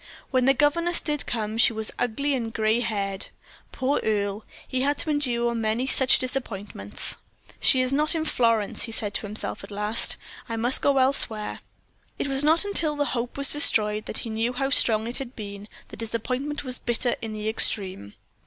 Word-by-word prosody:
When 255 -2 +2
the 270 +1 +4
governess 335 +5 +3
did 295 -2 -2
come 215 -3 -2
in, 220 - -5
she 240 - +6
was 220 0 -1
ugly 280 +5 0
and 230 -4 -2
gray 220 0 +1
haired. 200 -4 -2 0.4
Poor 265 +2 0
Earle! 205 -1 -1 0.2
he 255 -1 -2
had 285 +2 +1
to 310 - -1
endure 240 -5 0
many 225 +2 -1
such 265 0 +5
disappointments. 205 - -2 0.4
"She 260 - +4
is 255 +1 0
not 300 +4 +2
in 315 -1 -1
Florence," 230 -7 +1
he 225 - -8
said 210 -2 -3
to 210 - -3
himself 210 +2 -4
at - - -10
last. 210 +2 0 0.3
"I 230 - -2
must 240 +3 +4
go 280 -1 +2
elsewhere." 255 -5 +1 0.6
It - - -2
was 270 +1 +1
not 320 +5 +4
until 335 -7 +1
the 290 0 0
hope 240 +1 -3
was 280 -1 +3
destroyed 215 -7 +2
that - - -3
he 225 - -5
knew 225 +3 -1
how 270 +2 -1
strong 220 -5 +4
it 240 +2 0
had 265 -1 -7
been 200 -1 -8 0.2
the - - -10
disappointment 250 +7 -3
was 255 -2 -3
bitter 240 +1 0
in 225 -1 -5
the 215 0 -5
extreme. 190 - 0
235 Hz, 190 wpm, -25 LUFS, 215-270 Hz, 0.6 s, she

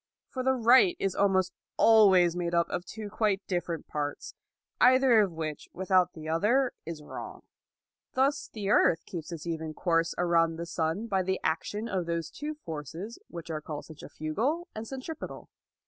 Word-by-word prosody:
For 260 - -4
the 265 +1 +2
right 255 - +5
is 195 - -1
almost 190 -2 +2 0.2
always 190 -6 +6
made 175 -1 -1
up 170 0 +3
of 175 - -3
two 220 +1 -7
quite 205 -1 0
different 175 -3 -3
parts, 145 -1 -4 0.5
either 255 -2 +6
of 200 -3 +1
which 155 -2 -5
without 185 -1 +2
the 155 -1 -9
other 225 +11 +2
is 160 -3 -6
wrong. - - -8 0.7
Thus 275 +3 +1
the 205 -3 -4
earth 165 -5 +4
keeps 170 -2 -7
its 165 -2 -6
even 160 -2 -4
course 165 -2 +1
around 165 -2 +2
the 170 +1 -5
sun 165 +4 -2
by 195 -4 +1
the 190 +1 -1
action 205 +7 -1
of 185 -6 -2
those 170 -1 -2
two 300 +1 -5
forces 165 - -7
which 170 -1 -8
are 155 -1 -3
called 150 -1 -6
centrifugal 220 - -3
and 220 +1 -6
centripetal. 270 +5 -7
180 Hz, 165 wpm, -29 LUFS, 165-225 Hz, 0.7 s, always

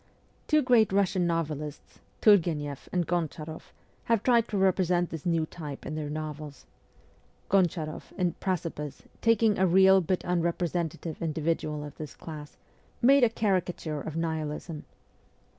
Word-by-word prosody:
Two 305 -1 +4
great 240 -5 +4
Russian 190 -2 +2
novelists, 155 -3 -4 0.2
Turgueneff 160 - +3
and 175 -2 0
Gonchar6ff, 160 -2 -3 0.4
have 230 -3 +2
tried 235 -2 +4
to 210 - -2
represent 180 -2 +2
this 160 0 -5
new 165 -2 +2
type 150 -4 -8
in - - -4
their 155 -1 -3
novels. 150 -1 -6 0.9
Goncharoff, 170 -5 0
in 180 -2 +1
Precipice, 165 -6 -3 0.2
taking 225 -2 +3
a 190 - +4
real 190 +2 +6
but 185 +2 -1
unrepresentative 170 -2 -1
individual 155 -1 -1
of 145 -1 -9
this 150 -3 -7
class, 150 -2 -9 0.4
made 270 +2 +5
a 240 - +6
caricature 180 -8 -1
of 155 - -6
Nihilism. 160 -1 -3
170 Hz, 130 wpm, -28 LUFS, 155-190 Hz, 0.9 s, real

